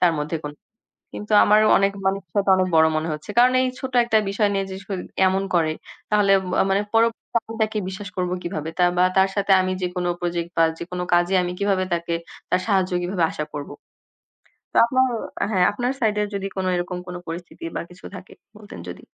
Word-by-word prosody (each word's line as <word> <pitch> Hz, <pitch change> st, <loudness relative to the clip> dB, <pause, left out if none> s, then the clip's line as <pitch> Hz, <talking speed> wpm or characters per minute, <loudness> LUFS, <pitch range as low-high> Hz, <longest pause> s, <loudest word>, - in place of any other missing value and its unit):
তার 175 Hz, -2 st, +4 dB
মধ্যে 155 Hz, +2 st, -2 dB
কোন। 145 Hz, -, -4 dB, 0.6 s
কিন্তু 210 Hz, +1 st, -6 dB
আমারও 215 Hz, +1 st, +5 dB
অনেক 195 Hz, 0 st, +2 dB
মানুষের 195 Hz, -3 st, -2 dB
সাথে 200 Hz, -1 st, +2 dB
অনেক 185 Hz, -, +2 dB
বড় 160 Hz, 0 st, +6 dB
মনে 160 Hz, +1 st, -2 dB
হচ্ছে। 150 Hz, +6 st, -7 dB
কারণ 250 Hz, +1 st, +6 dB
এই -, -, +2 dB
ছোট 260 Hz, -1 st, -5 dB
একটা 225 Hz, -2 st, +3 dB
বিষয় 205 Hz, +1 st, +1 dB
নিয়ে 195 Hz, -1 st, 0 dB
যেস 190 Hz, +1 st, -7 dB
করে, 190 Hz, -3 st, -3 dB, 0.2 s
এমন 190 Hz, +1 st, +1 dB
করে 160 Hz, -2 st, +2 dB, 0.4 s
তাহলে 205 Hz, -2 st, +4 dB, 0.3 s
আ -, -, +4 dB
মানে 200 Hz, +1 st, +2 dB
পরবর্তীতে 230 Hz, +1 st, +1 dB
আমি 225 Hz, -, -8 dB
তাকে 215 Hz, 0 st, 0 dB
বিশ্বাস 190 Hz, +1 st, -6 dB
করব 180 Hz, -1 st, -1 dB
কিভাবে? 160 Hz, -2 st, -4 dB
তার 180 Hz, 0 st, +4 dB
বা 180 Hz, -, +5 dB
তার 190 Hz, 0 st, +5 dB
সাথে 200 Hz, 0 st, +2 dB
আমি 185 Hz, 0 st, 0 dB
যেকোনো 180 Hz, 0 st, -2 dB
প্রজেক্ট 170 Hz, -1 st, -2 dB
বা 165 Hz, -, +6 dB
যেকোনো 180 Hz, +1 st, -5 dB
কাজে 175 Hz, +2 st, +2 dB
আমি 175 Hz, 0 st, -3 dB
কিভাবে 195 Hz, -2 st, +1 dB
তাকে, 170 Hz, 0 st, -2 dB, 0.4 s
তার 180 Hz, -, +2 dB
সাহায্য 190 Hz, -4 st, +1 dB
কিভাবে 175 Hz, 0 st, -1 dB
আশা 150 Hz, -, -4 dB
করব। 145 Hz, -1 st, -6 dB, 1.0 s
তো -, -, -26 dB
আপনার 260 Hz, +2 st, +2 dB, 0.5 s
হ্যাঁ, 185 Hz, -3 st, +3 dB
আপনার 245 Hz, +4 st, -1 dB
সাইডের 210 Hz, -2 st, +1 dB
যদি 195 Hz, 0 st, -3 dB
কোনো 185 Hz, -, -1 dB
এরকম 175 Hz, 0 st, -3 dB
কোনো 180 Hz, 0 st, -6 dB
পরিস্থিতি 170 Hz, +1 st, -8 dB
বা -, -, -1 dB
কিছু 180 Hz, +1 st, -15 dB
থাকে? 185 Hz, 0 st, -11 dB, 0.2 s
বলতেন 210 Hz, -, -11 dB
যদি। 90 Hz, 0 st, -8 dB
185 Hz, 200 wpm, -22 LUFS, 175-205 Hz, 1.0 s, বড়